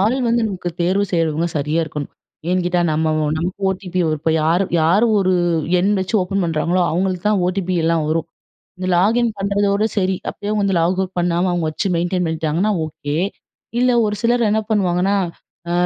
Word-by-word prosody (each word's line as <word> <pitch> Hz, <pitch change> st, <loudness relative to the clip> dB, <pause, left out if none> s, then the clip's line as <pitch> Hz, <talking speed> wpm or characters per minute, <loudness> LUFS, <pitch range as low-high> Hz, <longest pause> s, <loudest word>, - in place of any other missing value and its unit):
ஆள் 220 Hz, +6 st, +2 dB
வந்து 235 Hz, 0 st, +2 dB
நமக்கு 185 Hz, -3 st, -4 dB
தேர்வு 190 Hz, +4 st, +2 dB
செய்றவங்க 165 Hz, -1 st, +1 dB
சரியா 150 Hz, +3 st, 0 dB
இருக்கணும். 150 Hz, -2 st, -6 dB, 0.4 s
ஏன்னுகேட்டா? 180 Hz, -1 st, +1 dB
நம்ப 160 Hz, +1 st, +1 dB, 0.2 s
ஓ -, -, 0 dB
நமக்கு 180 Hz, +5 st, -3 dB
ஓடிபி. 185 Hz, -1 st, -3 dB, 0.2 s
இப்ப, 160 Hz, +2 st, 0 dB
யாரு 170 Hz, +5 st, +2 dB, 0.2 s
யாரு 175 Hz, +8 st, +4 dB
ஒரு 185 Hz, -1 st, +2 dB, 0.5 s
எண் 195 Hz, +4 st, +2 dB
வச்சு 190 Hz, +4 st, -3 dB
ஓப்பன் 195 Hz, +2 st, -1 dB
பண்ணுறாங்களோ, 170 Hz, +2 st, 0 dB
அவுங்களுக்கு 180 Hz, +2 st, -1 dB
தான் 205 Hz, -3 st, +2 dB
ஓடிபி 185 Hz, 0 st, -1 dB
எல்லா 165 Hz, +1 st, +2 dB
வரும். 160 Hz, +1 st, 0 dB, 0.5 s
இந்த 185 Hz, -, -3 dB
லாகின் 225 Hz, +6 st, +3 dB
பண்ணுறதோட 200 Hz, +1 st, +1 dB
சரி. 190 Hz, -1 st, +1 dB, 0.2 s
அப்டியே 205 Hz, -, -6 dB
அவுங்க 210 Hz, -1 st, 0 dB
வந்து 195 Hz, -2 st, +1 dB
லாக் 180 Hz, +3 st, +1 dB
அவுட் 190 Hz, -1 st, -3 dB
பண்ணாம 175 Hz, +1 st, +1 dB
அவுங்க 175 Hz, -2 st, -1 dB
வச்சு 160 Hz, +6 st, -2 dB
மெயின்டெயின் 175 Hz, +1 st, 0 dB
பண்ணிட்டாங்கன்னா, 160 Hz, +5 st, 0 dB
ஓகே. 150 Hz, -1 st, -5 dB, 0.6 s
இல்ல, 250 Hz, +1 st, +3 dB, 0.2 s
ஒரு 210 Hz, -, -1 dB
சிலர் 240 Hz, 0 st, +2 dB
என்ன 220 Hz, +1 st, +2 dB
பண்ணுவாங்கன்னா, 190 Hz, -1 st, +2 dB, 0.5 s
அ -, -, 0 dB
180 Hz, 175 wpm, -19 LUFS, 165-200 Hz, 0.6 s, யாரு